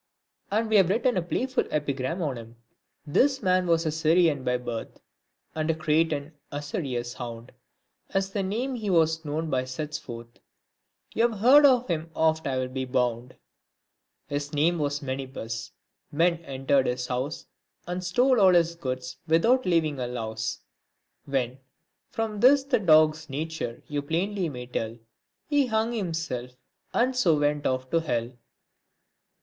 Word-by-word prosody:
And 220 +3 +1
we 220 -1 +4
have 190 -3 +5
written 240 +5 +2
a 180 - +1
playful 255 +9 -1
epigram 145 +3 -2
on 140 -4 -1
him: 115 0 -10 0.3
— - - -51
This 265 - +2
man 185 -1 +2
was 165 -1 +2
a 155 - +1
Syrian 160 -2 +3
by 125 0 +1
birth, 120 -2 -6
p - - -25 0.5
And 155 0 -2
a 165 - +2
Cretan 155 -1 0 0.2
usurious 140 -5 -3
hound, 115 -2 -8 0.6
As 195 0 -1
the 200 - -1
name 230 +8 -2
he 220 -5 -3
was 160 -2 +2
known 155 +1 -3
by 130 -1 +1
sets 150 +4 -4
forth; 115 -1 -10 0.7
You've 230 -1 +1
heard 275 +7 +7
of 255 -2 +3
him 165 -1 -2
oft 160 -1 +1
I'll 130 -1 -1
be 130 +1 -4
bound; 125 -1 -1 0.9
His 145 +1 -4
name 165 +4 +2
was 145 0 -1
Menippus 130 -4 -5 0.2
— - - -57
men 170 +3 +2
entered 135 0 +1
his 125 0 -1
house, 130 +5 -3 0.4
And 180 +1 -4
stole 245 +7 +3
all 185 -2 +6
his 170 -1 +3
goods 130 -5 -5
without 225 +10 +3
leaving 160 -5 +1
a 125 - -2
louse, 110 -2 -4 0.6
When 130 -2 -2 0.5
(from 220 -2 -3
this 270 +4 +6
the 275 -3 +1
dog's 155 -3 +4
nature 145 -4 -4
you 145 -1 -2
plainly 180 +5 -1
may 125 -3 -7
tell) 115 -2 -4 0.5
He 290 -3 +2
hung 220 +1 0
himself 165 - -3
up, - - -35 0.3
and 255 +2 +1
so 175 -11 +3
went 145 0 +1
off 130 0 -2
to 165 - +3
hell. 120 -6 -2
155 Hz, 160 wpm, -26 LUFS, 130-185 Hz, 0.9 s, heard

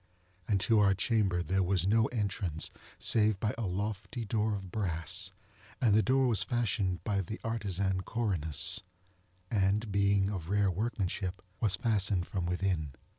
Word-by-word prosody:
And 100 -2 +2
to 110 +1 +4
our 100 -1 +5
chamber 95 -4 +1
there 95 +2 +1
was 90 -1 +1
no 110 +3 +4
entrance 100 -8 -2 0.3
save 105 -3 +3
by 110 +1 0
a 115 -3 -2
lofty 105 +5 -3
door 110 0 0
of 95 -3 -7
brass: 90 -1 -2 0.5
and 115 -5 +4
the 110 - +6
door 130 +3 +3
was 115 -6 +3
fashioned 105 -6 0
by 100 -2 0
the 105 +5 -6
artisan 100 -4 -1
Corinnos, 95 - -1 0.7
and, 105 +1 +1
being 100 -1 +3
of 90 -5 -4
rare 100 -1 +3
workmanship, 95 -2 -2 0.2
was 105 -4 +2
fastened 100 -4 +1
from 90 -2 -3
within. 90 -5 -1
100 Hz, 150 wpm, -31 LUFS, 95-110 Hz, 0.7 s, the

